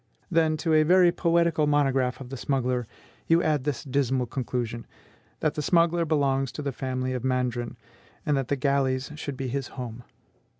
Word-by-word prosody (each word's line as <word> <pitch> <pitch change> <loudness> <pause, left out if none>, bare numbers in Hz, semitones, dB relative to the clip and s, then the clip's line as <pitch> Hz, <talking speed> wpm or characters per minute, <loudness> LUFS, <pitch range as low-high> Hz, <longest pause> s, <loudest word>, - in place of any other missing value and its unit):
Then, 160 -2 +3
to 160 +1 0
a 155 - +6
very 175 +2 +5
poetical 170 -3 +2
monograph 135 -3 +2
of 130 -2 -9
the 135 - -5
smuggler, 125 -3 -1 0.4
you 165 +1 +4
add 150 -4 +1
this 145 -3 -2
dismal 130 -2 0
conclusion, 120 -2 -4 0.5
that 155 - +1
the 150 - -3
smuggler 170 +2 +3
belongs 135 -4 +1
to 150 - -5
the 140 - -1
family 130 0 -3
of 125 -2 -3
Mandrin, 125 -2 -1 0.5
and 150 -3 +2
that 135 -3 -1
the 140 - +1
galleys 135 -1 0
should 145 -3 -6
be 135 - -3
his 135 +1 -3
home! 125 -1 -6
135 Hz, 175 wpm, -26 LUFS, 130-155 Hz, 0.5 s, a